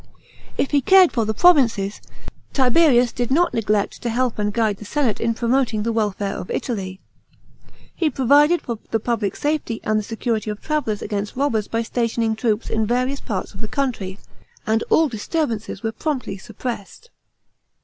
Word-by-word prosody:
§ - - -27
7. - - -30 0.4
If 275 - 0
he 285 -1 +3
cared 375 +4 +6
for 230 -4 0
the 220 - -1
provinces, 235 - +3 0.5
Tiberius 255 -2 +4
did 245 -1 -2
not 340 +6 +2
neglect 210 -2 0
to 240 - -2
help 240 -1 0
and 210 0 0
guide 215 -2 0
the - - -10
senate 245 +1 -1
in 230 0 +1
promoting 235 -2 +1
the 230 +1 -1
welfare 205 -2 -1
of - - -7
Italy. 190 -6 -3 0.9
He 330 -3 +1
piovided 290 +6 +4
for 235 -3 -5
the 225 - +1
public 220 -3 -1
safety 290 -6 -1
and 215 0 +1
the - - -4
security 225 0 -2
of 210 0 -4
travellers 290 -10 -2
against 205 0 -3
robbers 240 -6 0
by 230 0 -1
stationing 230 -1 0
troops 220 -1 -1
in 220 -1 0
various 255 +4 0
parts 195 -5 -4
of 195 - -10
the 220 - -4
country; 215 -8 -2 0.5
and 225 0 +1
all 320 - +4
disturbances 230 - -3
were 225 - -1
promptly 255 -8 -3
suppressed. 230 - -7
230 Hz, 175 wpm, -21 LUFS, 210-270 Hz, 0.9 s, cared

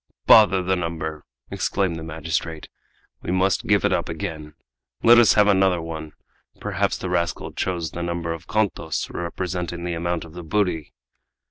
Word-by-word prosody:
"Bother 100 -4 +7
the 95 +1 +1
number!" 80 -3 -4 0.3
exclaimed 95 -4 0
the 80 - -6
magistrate. 80 0 -4 0.5
"We - - -7
must 95 +1 +1
give - - +3
it - - +2
up - - -1
again. 80 -4 -5 0.5
Let 120 +1 +8
us 120 - +6
have 105 - +6
another 95 -3 +3
one! 80 -2 -6 0.5
Perhaps - - -1
the - - -5
rascal 85 -1 -1
chose 85 -4 -2
the 85 - -5
number 85 -1 -2
of 85 +1 -10
contos 100 -7 -1
representing 85 0 -4
the 85 0 -2
amount 85 0 -2
of 80 - -14
the 90 - -7
booty!" 85 -3 -1
85 Hz, 160 wpm, -23 LUFS, 80-95 Hz, 0.5 s, Let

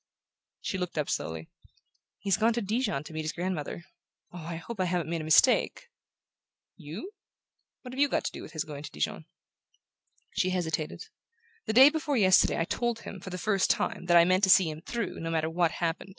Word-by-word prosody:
She 190 - -3
looked 180 -2 -4
up 150 - -1
slowly. 80 0 -4 0.7
"He's 195 -2 +1
gone 225 +2 +2
to 235 - -1
Dijon 210 - -1
to 160 - -11
meet 155 - -3
his 155 0 -3
grandmother. 175 -2 -4 0.5
Oh, 180 - -7
I 165 +1 -5
hope 195 +6 -8
I 185 - +2
haven't 175 -2 -1
made 165 -1 -1
a - - -6
mistake!" 250 - +3 0.9
"You? 175 - -8 0.7
Why, 250 - -8
what - - -10
have 260 - -6
you 285 0 +4
to - - -1
do - - -8
with - - -11
his 155 - -2
going 145 -2 -8
to 150 - -8
Dijon?" 75 - -3 1.1
She 185 - +1
hesitated. 160 -4 -2 0.6
"The 220 - 0
day 265 +5 +8
before 300 -3 -1
yesterday 190 -4 +4
I 165 - +1
told 240 +4 -2
him, 195 - -8
for 190 - -8
the 180 - -5
first 195 0 +1
time, - - 0
that 175 -1 +6
I 170 - +7
meant 185 +2 +2
to - - -2
see 185 -3 +6
him 155 +1 -9
through, 230 +2 -4
no 165 - -4
matter 160 -1 -1
what 170 0 +2
happened. 170 +3 -3
180 Hz, 210 wpm, -28 LUFS, 160-215 Hz, 1.1 s, day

